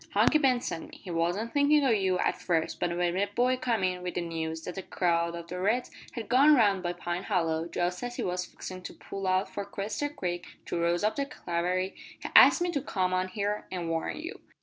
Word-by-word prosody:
"Hunky 310 - +4
Ben 260 -4 +3
sent 165 - -5
me. - - -12
He 180 - -9
wasn't 175 +7 -1
thinkin' 290 +1 +4
o' 265 - +3
you 190 -4 +2
at - - 0
first 165 -2 0
but 175 0 -1
when 175 0 +1
a 200 +1 +2
boy 245 +5 +2
came 235 -5 -1
in 180 -1 0
wi' 180 - -3
the 175 - -3
news 160 -1 -4
that 180 +3 -5
a - - -3
crowd 170 -2 0
o' 170 - -6
the 175 +2 -6
reds 220 +7 0 0.2
had 230 - -5
gone 280 +5 +6
round 205 -6 +3
by 175 -1 -2
Pine 175 0 -3
Hollow 165 -5 0
just 175 +1 -2
as 245 0 -4
he - - -3
was 180 0 -2
fixin' 185 0 -8
to - - -8
pull 195 -1 -6
out 185 +1 +2
for 200 - -5
Quester 200 +8 -3
Creek 175 -10 -4 0.2
to 170 - -2
rouse 170 +2 +1
up 215 +5 +1
the 280 0 -1
cavalry 180 -1 -2 0.3
he - - -5
asked 350 - +8
me 355 - 0
to 285 - -1
come 185 -8 -1
on 185 0 +1
here 205 +2 -2
an' 175 -3 -3
warn 165 0 -2
you." 325 +4 -7
185 Hz, 240 wpm, -29 LUFS, 175-225 Hz, 0.3 s, asked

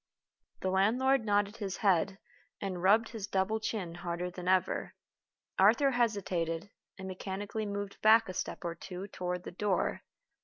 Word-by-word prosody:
The 185 - 0
land 195 +5 +3
lord 265 -1 +3
nodded 205 +1 +1
his 200 -4 -4
head, 195 -1 +2 0.4
and 185 -3 -3
rubbed 215 +5 +4
his 220 -4 -5
double 195 +3 0
chin 200 -6 -3
harder 175 0 -4
than 180 0 -7
ever. 185 0 +1 0.6
Arthur 230 +8 +5
hesitated, 200 -7 -1 0.3
and 190 -1 -7
mechanically 200 +3 -4
moved 200 0 -5
back 225 +1 +6
a 185 - -5
step - - -4
or 170 - -1
two 180 +2 -7
toward 180 -1 -3
the - - -7
door. 190 +1 0
195 Hz, 155 wpm, -32 LUFS, 180-215 Hz, 0.6 s, back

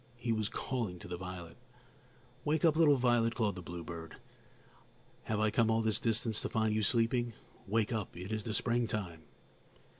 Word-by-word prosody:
He 120 0 -2
was 110 -1 0
calling 115 -9 -3
to - - -9
the 90 - -4
violet. 90 -2 -7 0.9
"Wake 155 +2 +2
up, 160 -2 +5
little 155 -3 +6
violet," 120 -2 +3
called 110 -4 +1
the 90 - -7
bluebird. 85 -2 -7 1.1
"Have 110 -1 -1
I 110 0 +2
come 110 +1 +3
all 110 0 +2
this 110 0 +2
distance 115 -1 +1
to - - -3
find 110 -1 +1
you 110 - +1
sleeping? 120 +2 +2 0.3
Wake 110 +2 +1
up; 105 -6 -3
it 95 +4 -6
is 110 -1 -1
the 110 -1 -2
springtime!" 105 -8 -1
110 Hz, 175 wpm, -33 LUFS, 95-120 Hz, 1.1 s, little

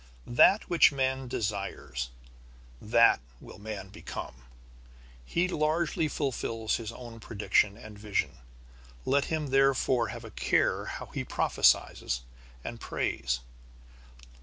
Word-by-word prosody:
That 190 - +5
which 170 -3 +6
man 130 -1 -1
desires, 100 - -3 0.7
that 115 - +5 0.2
will - - -12
man 105 -2 -6
become. 100 - -7 0.9
He 170 - 0
largely 160 -1 +1
fulfils 115 -6 -1
his 115 -1 -6
own 115 -1 -10
prediction 105 -1 +1
and 110 -3 -11
vision. 105 - -2 0.7
Let 140 +1 +2
him 155 -4 -2
therefore 135 -3 +3
have 120 -1 -7
a 110 - -9
care - - +1
how - - -6
he - - -2
prophesies - - +2 0.4
and - - -6
prays. 60 +1 -1
115 Hz, 110 wpm, -29 LUFS, 105-135 Hz, 0.9 s, which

